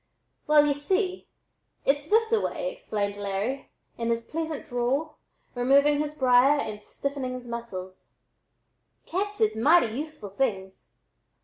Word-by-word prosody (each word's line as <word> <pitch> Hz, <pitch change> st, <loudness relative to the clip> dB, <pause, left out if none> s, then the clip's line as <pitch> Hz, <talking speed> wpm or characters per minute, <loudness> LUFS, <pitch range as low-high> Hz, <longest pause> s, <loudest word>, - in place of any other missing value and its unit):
"Well, 300 Hz, -1 st, +6 dB
y'u 290 Hz, -, +3 dB
see, 370 Hz, +6 st, -1 dB, 0.6 s
it's 285 Hz, +2 st, +1 dB
this 450 Hz, +1 st, +3 dB
a 450 Hz, -2 st, +3 dB
way," -, -, -2 dB
explained 205 Hz, -, -3 dB
Larry, 205 Hz, +7 st, -3 dB, 0.3 s
in 230 Hz, 0 st, -1 dB
his 230 Hz, 0 st, 0 dB
pleasant 315 Hz, +2 st, -4 dB
drawl, 260 Hz, +6 st, -1 dB, 0.4 s
removing 280 Hz, +4 st, +4 dB
his 300 Hz, 0 st, -2 dB
briar 260 Hz, +1 st, +5 dB
and 210 Hz, -5 st, -4 dB
stiffening 275 Hz, +3 st, -4 dB
his 250 Hz, -1 st, -8 dB
muscles: 190 Hz, -6 st, -7 dB, 0.9 s
"Cats 410 Hz, +3 st, -3 dB
is 440 Hz, -1 st, +2 dB
mighty 245 Hz, 0 st, +4 dB
useful 300 Hz, -7 st, -6 dB
things. 195 Hz, -4 st, -3 dB
275 Hz, 130 wpm, -27 LUFS, 230-310 Hz, 0.9 s, Well